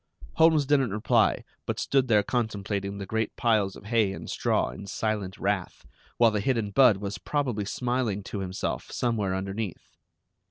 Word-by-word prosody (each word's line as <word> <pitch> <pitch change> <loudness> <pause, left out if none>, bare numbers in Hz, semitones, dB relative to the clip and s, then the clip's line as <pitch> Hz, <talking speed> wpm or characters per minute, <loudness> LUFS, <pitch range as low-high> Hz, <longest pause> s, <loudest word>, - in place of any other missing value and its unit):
Holmes 160 -3 +5
didn't 135 -3 +3
reply, 105 +2 +2 0.2
but - - -2
stood 135 -2 +2
there 105 -3 +4
contemplating 100 -4 -2
the 100 - -5
great 110 +2 -2
piles 105 -5 +1
of - - -13
hay 110 -3 +2
and - - -8
straw - - 0
in 100 - -9
silent 105 -2 -2
wrath, 100 -2 -2 0.3
while 115 -2 +5
the 105 - 0
hidden 110 -2 0
Budd 115 -1 +6
was 100 0 -5
probably 125 -9 -1
smiling 120 -3 -1
to 100 - -5
himself 95 -1 -3
somewhere 105 -6 -1
underneath. 95 +1 -5
105 Hz, 160 wpm, -27 LUFS, 100-120 Hz, 0.3 s, Budd